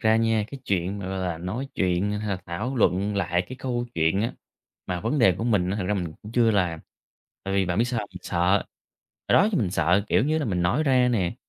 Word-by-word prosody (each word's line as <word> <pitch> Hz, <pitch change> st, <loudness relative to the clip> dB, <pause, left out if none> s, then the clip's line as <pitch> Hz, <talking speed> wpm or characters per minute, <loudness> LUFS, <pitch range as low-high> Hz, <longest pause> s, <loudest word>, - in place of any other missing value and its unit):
ra 110 Hz, 0 st, +4 dB
nha, 115 Hz, -1 st, +2 dB
cái 140 Hz, -2 st, -8 dB
chuyện 95 Hz, 0 st, -1 dB
mà, 95 Hz, -1 st, -5 dB
gọi 95 Hz, -, -3 dB
là, 90 Hz, -3 st, -2 dB
nói 105 Hz, +11 st, -4 dB
chuyện 90 Hz, +2 st, +1 dB
hay 105 Hz, -, -4 dB
là 100 Hz, -, 0 dB
thảo 105 Hz, +10 st, -3 dB
luận 100 Hz, -1 st, +2 dB
lại 90 Hz, -3 st, +1 dB
cái 130 Hz, -, -7 dB
câu 120 Hz, -2 st, -2 dB
chuyện 80 Hz, +4 st, +2 dB
á 115 Hz, -, -1 dB, 0.5 s
mà 90 Hz, -1 st, -2 dB
vấn 115 Hz, -, -1 dB
đề 100 Hz, -7 st, +6 dB
của 115 Hz, -, -2 dB
mình 100 Hz, -6 st, +2 dB
á, 100 Hz, -, -1 dB
thật 105 Hz, -, -2 dB
ra 105 Hz, -, +1 dB
mình 90 Hz, -5 st, -3 dB
cũng 105 Hz, -, -9 dB
chưa 115 Hz, -2 st, +4 dB
làm. 90 Hz, -6 st, 0 dB, 0.6 s
Tại 95 Hz, 0 st, -2 dB
vì 95 Hz, -1 st, +2 dB
bạn 90 Hz, +1 st, -1 dB
biết 115 Hz, -, +4 dB
sao 120 Hz, -2 st, -2 dB
hông? 105 Hz, -, -7 dB
Mình 90 Hz, -, -10 dB
sợ. 85 Hz, -, -3 dB, 0.9 s
Hồi -, -, +4 dB
đó 205 Hz, -, +5 dB
thì 185 Hz, -, +2 dB
mình 100 Hz, -6 st, 0 dB
sợ 85 Hz, +4 st, +2 dB
kiểu -, -, +3 dB
như 155 Hz, +2 st, +1 dB
là 155 Hz, -, -1 dB
mình 90 Hz, -7 st, -1 dB
nói 95 Hz, -, +2 dB
ra 130 Hz, -4 st, +3 dB
nè, 95 Hz, -8 st, 0 dB
100 Hz, 260 wpm, -25 LUFS, 90-115 Hz, 0.9 s, đề